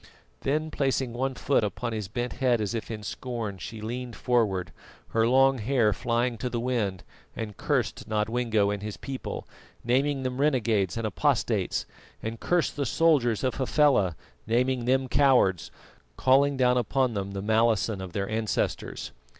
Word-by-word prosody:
Then, 155 Hz, +3 st, -1 dB
placing 135 Hz, -4 st, 0 dB
one 130 Hz, +2 st, -2 dB
foot 140 Hz, -3 st, +1 dB
upon 115 Hz, +3 st, -3 dB
his 105 Hz, -3 st, -3 dB
bent 120 Hz, +4 st, -3 dB
head 125 Hz, -3 st, +2 dB
as 105 Hz, +1 st, -2 dB
if 115 Hz, -, -4 dB
in 110 Hz, -2 st, -5 dB
scorn, 110 Hz, -3 st, -5 dB
she 110 Hz, +4 st, -7 dB
leaned 120 Hz, +1 st, -5 dB
forward, 105 Hz, -8 st, 0 dB, 0.4 s
her 115 Hz, 0 st, +2 dB
long 135 Hz, +1 st, +4 dB
hair 115 Hz, -2 st, +2 dB
flying 120 Hz, +1 st, -1 dB
to 125 Hz, -, -2 dB
the 120 Hz, -1 st, -2 dB
wind, 115 Hz, -7 st, -1 dB, 0.3 s
and 105 Hz, -3 st, -5 dB
cursed -, -, -1 dB
Nodwengo 110 Hz, -1 st, +1 dB
and 100 Hz, -1 st, -3 dB
his 105 Hz, 0 st, -5 dB
people, 135 Hz, -2 st, -6 dB, 0.4 s
naming 135 Hz, +3 st, +1 dB
them 130 Hz, +1 st, -2 dB
renegades 115 Hz, -, +1 dB
and 115 Hz, -, -2 dB
apostates, 105 Hz, -, 0 dB, 0.4 s
and 110 Hz, +1 st, -4 dB
cursed 175 Hz, -3 st, 0 dB
the 140 Hz, -, 0 dB
soldiers 135 Hz, -8 st, +2 dB
of 130 Hz, -, 0 dB
Hafela, 130 Hz, -, +3 dB, 0.3 s
naming 125 Hz, +2 st, +1 dB
them 130 Hz, +1 st, +2 dB
cowards, 125 Hz, -, +3 dB, 0.5 s
calling 135 Hz, +2 st, +4 dB
down 125 Hz, -1 st, +3 dB
upon 125 Hz, +1 st, +1 dB
them 100 Hz, -1 st, -3 dB
the 100 Hz, -, -3 dB
malison 110 Hz, -1 st, +2 dB
of 95 Hz, -2 st, -7 dB
their 100 Hz, -1 st, -2 dB
ancestors. 110 Hz, 0 st, -2 dB
120 Hz, 160 wpm, -27 LUFS, 105-130 Hz, 0.5 s, long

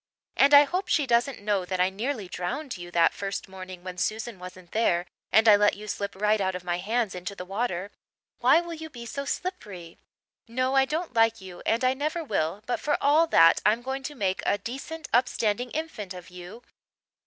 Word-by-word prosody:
And 280 Hz, -, +5 dB
I 285 Hz, -, +10 dB
hope 365 Hz, +6 st, -2 dB
she 295 Hz, -, +2 dB
doesn't 240 Hz, -1 st, +1 dB
know 205 Hz, -2 st, +1 dB
that 185 Hz, 0 st, -3 dB
I 185 Hz, +1 st, +3 dB
nearly 220 Hz, +1 st, -3 dB
drowned 210 Hz, -, -4 dB
you 175 Hz, -2 st, -8 dB
that 170 Hz, -1 st, +3 dB
first 200 Hz, 0 st, -4 dB
morning 185 Hz, -1 st, -10 dB
when 180 Hz, -1 st, -7 dB
Susan 220 Hz, 0 st, -2 dB
wasn't 180 Hz, -1 st, -11 dB
there 175 Hz, -6 st, +1 dB, 0.3 s
and 220 Hz, +2 st, +5 dB
I 210 Hz, -, +9 dB
let 205 Hz, 0 st, +3 dB
you 210 Hz, +1 st, -10 dB
slip 200 Hz, -1 st, -4 dB
right 210 Hz, +1 st, +2 dB
out 190 Hz, -1 st, 0 dB
of 180 Hz, -, -6 dB
my 175 Hz, 0 st, -2 dB
hands 220 Hz, +2 st, -1 dB
into 180 Hz, +2 st, -6 dB
the 180 Hz, -, -7 dB
water. 195 Hz, -1 st, -3 dB, 0.5 s
Why 335 Hz, -, +5 dB
will 340 Hz, -1 st, -7 dB
you 320 Hz, 0 st, -8 dB
be 240 Hz, -5 st, -9 dB
so 280 Hz, +5 st, -5 dB
slippery? 205 Hz, -, -5 dB, 0.5 s
No, 255 Hz, +3 st, 0 dB
I 270 Hz, 0 st, +5 dB
don't 315 Hz, +1 st, -3 dB
like 225 Hz, -1 st, +3 dB
you 185 Hz, -2 st, -10 dB
and 230 Hz, +3 st, +1 dB
I 255 Hz, 0 st, +4 dB
never 305 Hz, +5 st, -2 dB
will 195 Hz, -, -2 dB
but 245 Hz, -, -1 dB
for 295 Hz, -, 0 dB
all 305 Hz, +4 st, +4 dB
that 165 Hz, -, +6 dB
I'm 225 Hz, +3 st, +2 dB
going 265 Hz, +1 st, -3 dB
to 295 Hz, +3 st, -6 dB
make 190 Hz, -6 st, -1 dB
a 205 Hz, -, +1 dB
decent, 285 Hz, +7 st, -7 dB
upstanding 245 Hz, -1 st, +1 dB
infant 230 Hz, -, -5 dB
of 180 Hz, 0 st, -11 dB
you. 180 Hz, +6 st, -10 dB
215 Hz, 210 wpm, -27 LUFS, 185-265 Hz, 0.5 s, I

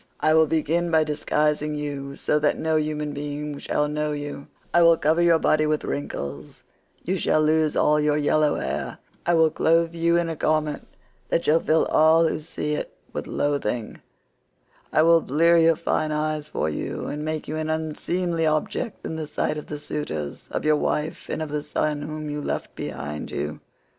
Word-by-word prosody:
I 155 Hz, -, +3 dB
will 160 Hz, 0 st, +5 dB
begin 165 Hz, +3 st, 0 dB
by 160 Hz, -1 st, +4 dB
disguising 150 Hz, 0 st, 0 dB
you 140 Hz, -2 st, -4 dB
so 150 Hz, -, +1 dB
that 150 Hz, 0 st, +1 dB
no 160 Hz, 0 st, 0 dB
human 150 Hz, -1 st, -1 dB
being 145 Hz, 0 st, -5 dB
shall 150 Hz, -, 0 dB
know 150 Hz, 0 st, -1 dB
you; 145 Hz, -1 st, -6 dB, 0.3 s
I 175 Hz, -, +5 dB
will 165 Hz, -1 st, +6 dB
cover 160 Hz, +3 st, +2 dB
your 170 Hz, -1 st, +5 dB
body 155 Hz, -1 st, +2 dB
with 155 Hz, 0 st, 0 dB
wrinkles; 70 Hz, -, -5 dB, 0.4 s
you 185 Hz, +2 st, -1 dB
shall 155 Hz, -, +2 dB
lose 155 Hz, 0 st, +2 dB
all 150 Hz, 0 st, +3 dB
your 150 Hz, 0 st, +2 dB
yellow 150 Hz, 0 st, +2 dB
hair; -, -, -3 dB, 0.3 s
I 175 Hz, -, +4 dB
will 160 Hz, -1 st, +4 dB
clothe 165 Hz, +1 st, +2 dB
you 170 Hz, 0 st, +2 dB
in 170 Hz, -1 st, +1 dB
a 165 Hz, -, -3 dB
garment 155 Hz, -1 st, 0 dB, 0.4 s
that 170 Hz, -, +1 dB
shall 160 Hz, +2 st, +4 dB
fill 160 Hz, 0 st, +2 dB
all 160 Hz, +1 st, +5 dB
who -, -, -2 dB
see 150 Hz, -1 st, -4 dB
it -, -, -3 dB, 0.2 s
with -, -, -4 dB
loathing; 125 Hz, -6 st, -2 dB, 0.9 s
I 155 Hz, -, +4 dB
will 165 Hz, 0 st, +6 dB
blear 165 Hz, +5 st, +3 dB
your 165 Hz, 0 st, +5 dB
fine 155 Hz, 0 st, -1 dB
eyes 150 Hz, 0 st, -1 dB
for 150 Hz, -, -2 dB
you, 75 Hz, -, -4 dB
and 150 Hz, +1 st, -4 dB
make 155 Hz, 0 st, -3 dB
you 155 Hz, -, -3 dB
an 155 Hz, 0 st, -2 dB
unseemly 165 Hz, +2 st, -1 dB
object 195 Hz, +8 st, -2 dB
in 160 Hz, -, -4 dB
the 155 Hz, -1 st, -4 dB
sight 150 Hz, -, -1 dB
of 150 Hz, -, -7 dB
the 150 Hz, -, -5 dB
suitors, 80 Hz, -, -5 dB
of -, -, -3 dB
your 155 Hz, 0 st, +4 dB
wife, 150 Hz, +1 st, -2 dB
and 160 Hz, -, -2 dB
of 155 Hz, -, -6 dB
the 150 Hz, 0 st, -2 dB
son 150 Hz, 0 st, -1 dB
whom 155 Hz, 0 st, -5 dB
you 150 Hz, 0 st, -3 dB
left -, -, -4 dB
behind 75 Hz, +2 st, -5 dB
you. 75 Hz, +1 st, -4 dB
155 Hz, 190 wpm, -24 LUFS, 150-160 Hz, 0.9 s, will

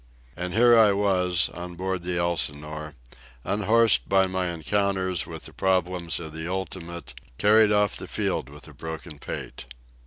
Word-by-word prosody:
And 90 Hz, +1 st, -4 dB
here 120 Hz, +1 st, +6 dB
I 110 Hz, -3 st, +6 dB
was, 90 Hz, -3 st, +1 dB
on 90 Hz, 0 st, -8 dB
board 95 Hz, 0 st, -2 dB
the 90 Hz, 0 st, -2 dB
Elsinore, 75 Hz, -3 st, -2 dB, 0.5 s
unhorsed 105 Hz, -, +3 dB
by 95 Hz, 0 st, +4 dB
my 95 Hz, -1 st, -1 dB
encounters 95 Hz, +1 st, -1 dB
with -, -, -8 dB
the -, -, -9 dB
problems 90 Hz, -2 st, 0 dB
of 80 Hz, -2 st, -8 dB
the 80 Hz, +2 st, -4 dB
ultimate, 85 Hz, -2 st, -5 dB, 0.2 s
carried 110 Hz, +1 st, +5 dB
off 105 Hz, -1 st, +2 dB
the -, -, -7 dB
field -, -, -2 dB
with 75 Hz, 0 st, -12 dB
a -, -, -13 dB
broken 80 Hz, -1 st, -8 dB
pate. -, -, -7 dB
90 Hz, 155 wpm, -25 LUFS, 85-100 Hz, 0.5 s, here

